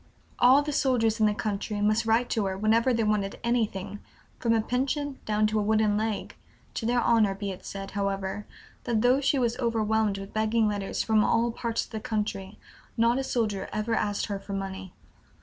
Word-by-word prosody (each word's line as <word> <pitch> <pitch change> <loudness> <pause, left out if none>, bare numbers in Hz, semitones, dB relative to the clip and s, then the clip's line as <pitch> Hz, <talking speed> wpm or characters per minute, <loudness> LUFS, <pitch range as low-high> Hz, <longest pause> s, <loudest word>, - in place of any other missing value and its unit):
All 260 +4 +6
the 300 - -3
soldiers 235 -5 +1
in 215 - +4
the 210 - +1
country 210 0 -3
must 215 +2 +1
write 230 +2 +3
to 220 -4 +1
her 190 0 -3
whenever 225 +5 +3
they 230 -2 +1
wanted 210 -2 0
anything, 210 -4 -1 0.4
from 235 - 0
a - - +3
pension 270 +4 -2
down 215 0 +1
to 215 0 +1
a - - +1
wooden 215 0 +2
leg 215 0 -2 0.4
(to 225 - -3
their 245 +1 +2
honor 220 -4 +3
be 200 0 -4
it 185 - -9
said, 195 0 -7
however, 195 0 -3 0.4
that 230 -2 0
though 255 +3 +4
she 275 +1 +2
was 240 -2 +1
overwhelmed 220 -3 +1
with 195 0 -8
begging 220 +1 +2
letters 205 -2 -2
from 220 -1 +3
all 230 +2 +2
parts 230 0 -2
of - - -22
the 220 - -4
country, 210 -2 -3 0.4
not 235 +3 +3
a - - -1
soldier 215 -7 -1
ever 215 +2 -2
asked 205 -2 0
her 200 -1 -4
for 200 0 -8
money). 195 -1 -5
215 Hz, 200 wpm, -27 LUFS, 205-235 Hz, 0.4 s, All